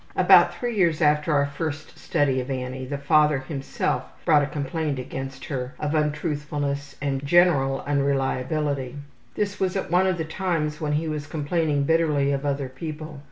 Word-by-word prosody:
About - - +6
three 240 -2 -3
years 170 -6 +2
after 150 0 +3
our 140 -1 +3
first 150 +1 -5
study 135 -3 +1
of 125 - -8
Annie, 130 0 -4
the 140 +1 -3
father 150 0 +3
himself 135 +1 -2 0.2
brought 150 - +5
a 145 - 0
complaint 150 0 -2
against 135 +1 -6
her 130 -3 -4
of 150 0 -2
untruthfulness 150 -2 -2
and 140 -1 -2
general 140 -4 +3
unreliability. 140 -1 -1 0.4
This 205 -2 -2
was 190 -1 0
at 190 - -3
one 180 +2 +4
of 185 -2 +1
the 160 - -2
times 160 -3 -2
when 150 -1 -1
he 155 +2 0
was 150 -2 -4
complaining 150 -1 0
bitterly 150 -2 +2
of 140 +1 -1
other 140 -1 -1
people. 155 +2 -7
145 Hz, 165 wpm, -24 LUFS, 140-160 Hz, 0.4 s, About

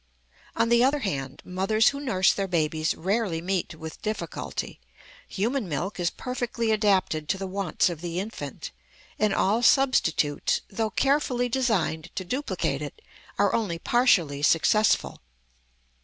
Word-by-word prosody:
On 230 - +2
the 235 0 +5
other 280 +2 +2
hand, 135 - -4
mothers 195 +5 +2
who 280 - -5
nurse 195 -10 +2
their 195 -1 -2
babies 160 -2 0
rarely 195 -1 -1
meet 180 -1 -2
with 160 0 -9
difficulty. 215 0 -4 0.5
Human 225 +1 -2
milk 175 +7 -3
is 175 -1 +1
perfectly 245 -2 -3
adapted 190 -8 +1
to - - +1
the 195 - -4
wants 190 -2 0
of 170 -3 -4
the 175 0 -3
infant; 185 - -6 0.5
and 215 -1 +2
all 205 +4 +2
substitutes, 195 - +2
though 220 +2 -2
carefully 270 -2 +1
designed 190 -12 0
to 185 - -4
duplicate 265 +10 -2
it, - - -7 0.4
are - - +2
only 205 -7 -1
partially 170 - +2
successful. 180 +8 +2
195 Hz, 140 wpm, -26 LUFS, 165-235 Hz, 0.5 s, the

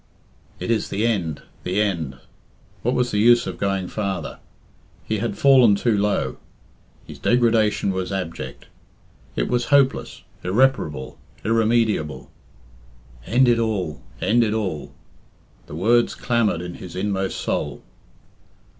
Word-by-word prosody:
"It - - -2
is 110 -3 0
the 105 +3 -1
end 90 -10 -1 0.2
the 90 +3 -1
end." 85 -10 -1 0.6
What 125 +2 0
was 125 -1 +1
the 105 - 0
use 120 +2 +5
of 95 - -6
going 95 -2 -1
farther? 95 -6 -4 0.7
He 110 -1 -1
had 115 +2 -3
fallen 130 -6 +6
too 115 +2 +1
low. 105 0 0 0.7
His - - -11
degradation 115 -4 +2
was 95 0 -3
abject. 80 -10 -5 0.7
It - - 0
was 120 -1 0
hopeless, 140 -2 +2 0.2
irreparable, 90 - +1 0.3
irremediable. 110 -8 +1 1.0
"End 125 +2 +4
it 120 -1 +4
all 100 -9 -2 0.2
end 120 +2 +3
it 110 -1 0
all." 95 -9 -3 0.8
The 75 - -8
words 115 +8 +2
clamoured 115 -8 0
in 90 0 -6
his 90 - -9
inmost 95 0 -2
soul. - - -3
105 Hz, 130 wpm, -22 LUFS, 90-120 Hz, 1.0 s, fallen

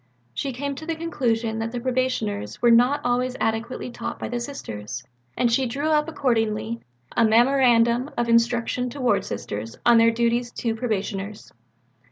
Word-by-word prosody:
She 270 - -2
came 280 +3 -3
to 315 - -7
the 330 - -1
conclusion 235 -9 -1
that 225 0 -2
the 245 - -3
Probationers 240 - -1
were 240 - +4
not 245 +5 +4
always 250 +1 0
adequately 225 +3 -2
taught - - -5
by - - -5
the 245 - -2
Sisters, 110 - -6 0.3
and 240 -1 +2
she 255 +2 +2
drew 280 +6 -2
up 305 0 +2
accordingly 230 -5 0 0.3
a - - +4
"Memorandum 240 +1 +4
of 240 - +1
Instruction 235 +1 +2
to 280 - -9
Ward 240 -6 +2
Sisters 105 +2 -5
on 235 -1 +7
their 230 0 +6
duties 235 +1 +1
to 230 -2 -1
Probationers." 210 -3 -4
235 Hz, 165 wpm, -24 LUFS, 225-255 Hz, 0.3 s, on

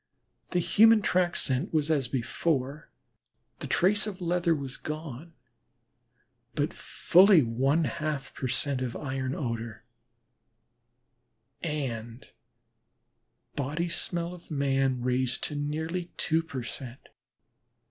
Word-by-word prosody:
The 180 - -1
human 215 +4 +5
track 180 -2 +2
scent 135 +7 0
was 155 -1 +1
as 140 -5 +2
before, 135 +3 -2 0.7
the - - -5
trace 205 +4 +4
of 195 -3 -6
leather 175 -1 +1
was 140 -3 -5
gone, 155 0 -7 1.2
but 145 +1 0
fully 185 -2 +5
one 135 +7 +1
half 155 -3 -3
per 130 - -3
cent, 130 +1 -1
of 125 -2 -3
iron 130 -2 -3
odor, 115 -5 -4 1.8
and 125 -7 -4 1.3
body 150 +5 -2
smell 170 0 -1
of 180 - -13
man 135 -4 +1
raised 125 0 0
to 150 - -2
nearly 160 +4 -3
two 160 0 +1
per 140 -6 -6
cent. 125 +1 -8
145 Hz, 110 wpm, -28 LUFS, 130-170 Hz, 1.8 s, human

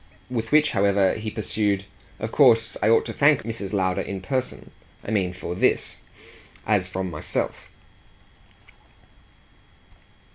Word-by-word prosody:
With 115 -2 -3
which, 150 0 +4
however, 100 -1 +2
he 110 0 -4
pursued: 105 -2 -1 0.3
"Of - - -5
course 115 0 +4
I 110 - +3
ought 115 - +4
to - - -5
thank 145 -1 +3
Mrs. 110 -4 -5
Lowder 95 -3 0
in 100 -1 -5
person. 130 +7 -4 0.3
I - - -4
mean 95 -4 +1
for 90 -1 -6
THIS 90 - +1 0.7
as 100 -4 +2
from 95 0 -4
myself." 75 - -3
100 Hz, 130 wpm, -24 LUFS, 95-115 Hz, 0.7 s, which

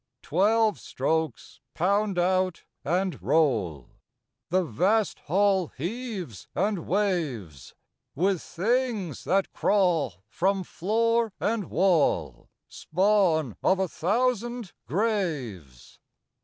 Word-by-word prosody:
Twelve 210 +6 +2
strokes 155 -1 -2 0.2
pound 200 +2 +1
out 185 0 +1 0.2
and 180 +4 -1
roll; 105 - +1 0.6
The 185 +2 +2
vast 195 - +1
Hall 190 +1 +2
heaves 185 - -5
and 200 -5 -1
waves 150 - -2 0.4
With 185 +3 +1
things 215 - -1
that 195 +1 +1
crawl 165 - +1
from 190 +1 0
floor 230 +5 0
and 220 -2 -1
wall 140 - +1 0.2
Spawn 180 - +1
of 190 - +3
a 190 0 0
thousand 235 +2 -1
graves. 140 - -3
185 Hz, 90 wpm, -26 LUFS, 155-210 Hz, 0.6 s, of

